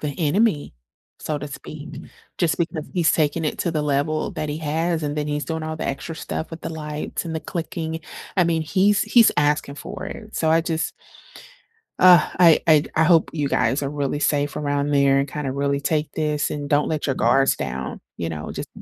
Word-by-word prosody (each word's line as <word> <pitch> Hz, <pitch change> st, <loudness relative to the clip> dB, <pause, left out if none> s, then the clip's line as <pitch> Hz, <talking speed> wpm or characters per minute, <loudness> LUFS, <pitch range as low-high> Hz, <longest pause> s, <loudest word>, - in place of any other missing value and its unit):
the 150 Hz, -, -2 dB
enemy, 165 Hz, -, +1 dB, 0.4 s
so 150 Hz, -1 st, -3 dB
to 145 Hz, +1 st, -6 dB
speak, 150 Hz, +2 st, -9 dB, 0.5 s
just 170 Hz, -4 st, +2 dB
because 165 Hz, -2 st, -2 dB
he's 170 Hz, -4 st, +3 dB
taking 155 Hz, +1 st, +1 dB
it 150 Hz, -, -2 dB
to 175 Hz, -, 0 dB
the 155 Hz, -2 st, -1 dB
level 150 Hz, +2 st, 0 dB
that 155 Hz, -, -4 dB
he 150 Hz, +1 st, -3 dB
has, 160 Hz, +2 st, -1 dB
and 145 Hz, 0 st, -2 dB
then 150 Hz, -1 st, -1 dB
he's 150 Hz, 0 st, -2 dB
doing 160 Hz, -1 st, -3 dB
all 155 Hz, 0 st, -4 dB
the -, -, -4 dB
extra 140 Hz, +4 st, -4 dB
stuff 160 Hz, 0 st, -5 dB
with 165 Hz, 0 st, -8 dB
the -, -, -5 dB
lights 150 Hz, 0 st, -4 dB
and 165 Hz, -1 st, -4 dB
the 160 Hz, -, -2 dB
clicking. 165 Hz, -1 st, -4 dB, 0.4 s
I 180 Hz, -, +4 dB
mean, 165 Hz, -1 st, +1 dB
he's 195 Hz, +5 st, +3 dB
he's 225 Hz, +1 st, +5 dB
asking 150 Hz, -1 st, +1 dB
for -, -, -7 dB
it. 215 Hz, -1 st, -9 dB
So 160 Hz, -, +1 dB
I 165 Hz, +1 st, +5 dB
just 160 Hz, -1 st, -2 dB, 1.1 s
Ah, 180 Hz, -3 st, +7 dB
I 170 Hz, -3 st, +7 dB
I 155 Hz, -3 st, +6 dB
I 160 Hz, -, +5 dB
hope 165 Hz, -1 st, +4 dB
you 150 Hz, -3 st, -1 dB
guys 125 Hz, +1 st, +1 dB
are 140 Hz, -, -1 dB
really 145 Hz, 0 st, -2 dB
safe 145 Hz, -1 st, 0 dB
around 145 Hz, 0 st, -1 dB
there 140 Hz, -1 st, +4 dB
and 140 Hz, +1 st, 0 dB
kinda 140 Hz, -1 st, -3 dB
really 140 Hz, +1 st, 0 dB
take 150 Hz, +1 st, 0 dB
this, 150 Hz, -1 st, -1 dB
and 145 Hz, -1 st, -4 dB
don't 145 Hz, 0 st, +2 dB
let 155 Hz, -2 st, -2 dB
your 135 Hz, -, 0 dB
guards 135 Hz, +4 st, +3 dB
down, 65 Hz, -1 st, -5 dB, 0.2 s
you 85 Hz, -, -3 dB
know? 75 Hz, -2 st, -5 dB
Just -, -, -6 dB
150 Hz, 210 wpm, -22 LUFS, 145-165 Hz, 1.1 s, Ah